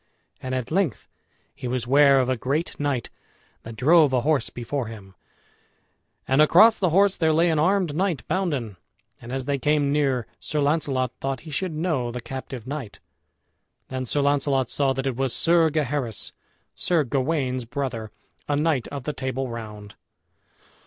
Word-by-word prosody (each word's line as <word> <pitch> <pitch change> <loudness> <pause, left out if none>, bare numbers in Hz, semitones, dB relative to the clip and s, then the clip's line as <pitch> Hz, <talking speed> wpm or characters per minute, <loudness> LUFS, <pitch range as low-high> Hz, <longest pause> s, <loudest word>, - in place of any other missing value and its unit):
And 130 0 -3
at 130 +1 -4
length 180 - 0 0.5
he 125 - -7
was 125 -1 -2
ware 140 +1 +5
of 130 - +1
a 130 - +1
great 140 +8 -2
knight 140 -5 -2 0.5
that 115 0 -9
drove 150 +3 +5
a 125 - +3
horse 150 +1 +1
before 125 +1 -4
him, 100 -4 -10 1.1
and 135 +3 +4
across 200 +9 +6
the 185 - +2
horse 195 +3 +4
there 160 -1 +2
lay 165 +2 +3
an 155 - +1
armed 180 -1 +2
knight 170 - -1
bounden. 140 - -2 0.4
And 120 - -9
as 130 -1 -3
they 140 0 -1
came 145 0 +2
near, 135 -5 +1
Sir 150 - -3
Launcelot 140 -4 0
thought 135 0 -2
he 155 -1 -10
should 175 +4 -2
know 155 -7 -1
the 125 - -5
captive 125 -1 -7
knight. 135 -5 -6 0.9
Then 130 0 -3
Sir 145 +3 0
Launcelot 140 -2 +1
saw 140 -2 +1
that 135 +1 -3
it 130 -3 -2
was 135 -2 0
Sir 165 -1 +4
Gaheris, 140 - -2 0.4
Sir 170 -4 +1
Gawain's 130 -1 -1
brother, 115 -4 -4 0.4
a 145 - +2
knight 150 -4 +1
of 140 -3 -6
the 150 - -3
Table 130 -1 -3
Round. 105 -3 -8
140 Hz, 165 wpm, -24 LUFS, 125-155 Hz, 1.1 s, across